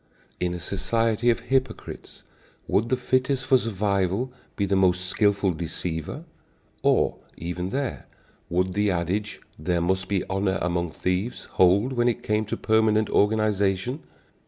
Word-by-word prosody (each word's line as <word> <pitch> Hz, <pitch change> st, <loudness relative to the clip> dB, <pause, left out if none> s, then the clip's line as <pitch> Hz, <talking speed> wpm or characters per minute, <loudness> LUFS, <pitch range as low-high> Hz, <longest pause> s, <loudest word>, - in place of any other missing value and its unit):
In 90 Hz, 0 st, -1 dB
a -, -, -5 dB
society 115 Hz, +5 st, +1 dB
of 115 Hz, 0 st, +2 dB
hypocrites, 130 Hz, +2 st, -3 dB, 0.4 s
would 110 Hz, +3 st, +1 dB
the 130 Hz, -, +2 dB
fittest 130 Hz, +1 st, 0 dB
for 130 Hz, -1 st, +5 dB
survival 100 Hz, +2 st, 0 dB, 0.2 s
be 100 Hz, -, 0 dB
the 100 Hz, 0 st, +1 dB
most 90 Hz, -1 st, +3 dB
skilful 100 Hz, 0 st, +2 dB
deceiver? 80 Hz, -, -4 dB, 0.6 s
Or, -, -, +2 dB, 0.2 s
even 90 Hz, +2 st, -4 dB
there, 135 Hz, +3 st, -3 dB, 0.4 s
would 90 Hz, +2 st, 0 dB
the 105 Hz, +1 st, +2 dB
adage, 95 Hz, +4 st, -2 dB, 0.2 s
"There 85 Hz, +3 st, 0 dB
must 95 Hz, +2 st, 0 dB
be 100 Hz, -2 st, 0 dB
honor 95 Hz, 0 st, 0 dB
among 85 Hz, -1 st, -1 dB
thieves," 90 Hz, +6 st, -2 dB
hold, 100 Hz, +8 st, +3 dB
when 120 Hz, -1 st, +2 dB
it 120 Hz, -, 0 dB
came 105 Hz, 0 st, 0 dB
to 105 Hz, -, -3 dB
permanent 110 Hz, -1 st, +2 dB
organization? 105 Hz, -, +1 dB
100 Hz, 140 wpm, -25 LUFS, 90-115 Hz, 0.6 s, for